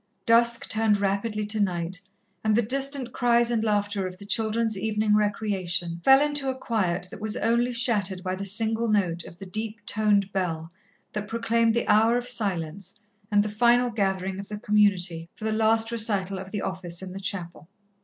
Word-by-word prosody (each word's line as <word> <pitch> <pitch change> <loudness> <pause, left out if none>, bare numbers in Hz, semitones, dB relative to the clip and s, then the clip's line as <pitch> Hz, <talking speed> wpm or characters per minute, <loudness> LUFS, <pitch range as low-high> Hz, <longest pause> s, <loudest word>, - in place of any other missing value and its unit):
Dusk 235 +2 +3
turned 220 -2 +2
rapidly 205 +2 -1
to 210 +1 -2
night, 180 -2 -1 0.4
and 215 -1 +2
the 235 - +3
distant 270 +1 0
cries 240 -1 +2
and 225 -2 0
laughter 205 -2 0
of 185 0 -9
the 200 - -11
children's 220 +1 0
evening 210 +1 +1
recreation 190 -5 -1
fell 270 0 +7
into 290 -2 -1
a 260 - -3
quiet 190 -8 -1
that - - -10
was 220 +2 -3
only 235 +2 +1
shattered 205 -7 0
by 185 -1 -2
the 190 +1 -4
single 220 +3 +1
note 180 -6 0
of 170 - -12
the 195 - -9
deep 215 +2 -6
toned 205 -2 +1
bell 165 -4 -2 0.4
that 210 0 -4
proclaimed 230 0 +1
the 235 - 0
hour 225 +3 +4
of 245 0 -3
silence 195 -6 -2 0.3
and 205 -1 +3
the - - -3
final 240 +3 +3
gathering 190 -3 -1
of 200 - -8
the 210 - -5
Community 195 -6 +1
for - - -12
the 220 - 0
last 225 +1 +2
recital 200 -4 +1
of 190 0 -8
the 205 0 -4
Office 185 -1 -3
in 185 - -7
the 190 - -7
chapel. 180 -4 -5
210 Hz, 185 wpm, -26 LUFS, 190-230 Hz, 0.4 s, fell